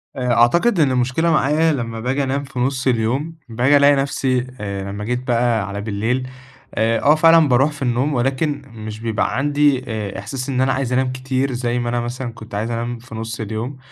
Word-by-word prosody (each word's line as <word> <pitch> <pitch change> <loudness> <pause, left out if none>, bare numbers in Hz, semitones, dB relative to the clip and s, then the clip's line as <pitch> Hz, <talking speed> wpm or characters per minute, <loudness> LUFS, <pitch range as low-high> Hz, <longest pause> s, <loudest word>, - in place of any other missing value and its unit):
آآ، 125 -2 0
أعتقد 170 - +3
إن 140 -4 +4
المشكلة 130 +7 +1
معايا 155 +2 +3
لما 115 -4 -4
باجي 135 +4 -1
أنام 135 +2 -1
في 135 -2 -7
نُصّ 130 +1 0
اليوم، 130 +7 0
باجي 125 +5 +3
ألاقي 140 0 +5
نفسي 130 -2 0
آآ، 100 -1 -4
لمَّا 105 +1 -5
جيت 125 +3 -3
بقى 115 -3 +1
على 100 0 -5
بالليل، 115 +5 -1 0.5
آآ، 115 +1 +2
آه 150 +2 +5
فعلًا 165 -1 +6
باروح 135 +4 +3
في 150 - -12
النوم 130 +4 0
ولكن 135 +3 0
مش 110 -2 -8
بيبقى 115 +1 -1
عندي 145 -2 +2
آآ، 105 -4 -4
إحساس 130 +6 -5
إن 130 -1 0
أنا 135 0 +2
عايز 130 -2 -2
أنام 130 0 +1
كتير 130 +1 -2
زي 120 0 -1
ما 120 0 -2
أنا 120 0 0
مثلًا 120 +1 -4
كنت 110 -3 -10
عايز 110 +3 -2
أنام 120 +1 -3
في 115 -1 -11
نُصّ 115 +1 -5
اليوم، 110 +5 -4
125 Hz, 205 wpm, -20 LUFS, 115-135 Hz, 0.5 s, فعلًا